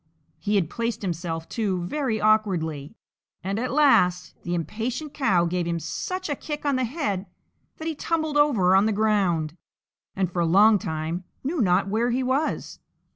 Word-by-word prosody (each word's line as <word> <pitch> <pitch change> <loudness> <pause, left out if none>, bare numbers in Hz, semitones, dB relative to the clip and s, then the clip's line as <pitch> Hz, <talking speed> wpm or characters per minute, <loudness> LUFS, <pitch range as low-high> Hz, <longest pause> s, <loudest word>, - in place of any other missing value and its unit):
He 210 0 -1
had 190 -6 +2
placed 230 +4 -3
himself, 165 -2 -3
too, 195 -6 -1
very 240 +2 -1
awkwardly, 185 -8 +1 0.5
and 195 +3 -2
at 255 - -2
last 215 -12 +3
the 175 0 -2
impatient 235 - -4
cow 185 -12 +2
gave 175 0 -1
him 170 0 -1
such 370 - -4
a 290 - -1
kick 295 +1 -6
on 285 -2 +2
the 255 0 +1
head 210 - -3 0.5
that 320 - -6
he 325 - -1
tumbled 315 0 -2
over 230 -12 +4
on 195 +3 +4
the 220 - +1
ground, 190 -7 +1 0.6
and 185 -2 0
for 175 - -3
a 170 - +2
long 205 +5 +6
time 160 +2 -3 0.2
knew 295 +2 -1
not 190 -1 +3
where 225 +4 +1
he 255 +2 0
was. 265 +5 -1
210 Hz, 175 wpm, -25 LUFS, 175-260 Hz, 0.6 s, long